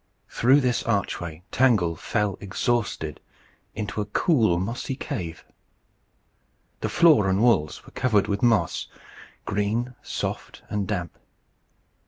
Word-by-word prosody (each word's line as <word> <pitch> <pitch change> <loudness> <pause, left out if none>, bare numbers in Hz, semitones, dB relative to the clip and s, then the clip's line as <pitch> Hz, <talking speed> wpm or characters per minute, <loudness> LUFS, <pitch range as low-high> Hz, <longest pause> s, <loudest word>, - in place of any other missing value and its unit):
Through 135 +5 +4
this 125 -2 +1
archway 90 -6 -2
Tangle 105 -11 +3
fell 105 +4 -1
exhausted 115 +3 -1 0.6
into 105 -1 -3
a - - -2
cool 110 - +2
mossy 115 +7 -3
cave. 90 - -5 1.3
The - - -2
floor 150 - +5
and 95 +1 +2
walls 75 -11 +2
were - - -14
covered 105 -6 +2
with 100 0 -1
moss 115 -3 +2 0.6
green, 110 +5 -1
soft, - - -5
and 105 -2 -1
damp. 90 -5 -3
105 Hz, 115 wpm, -25 LUFS, 95-120 Hz, 1.3 s, floor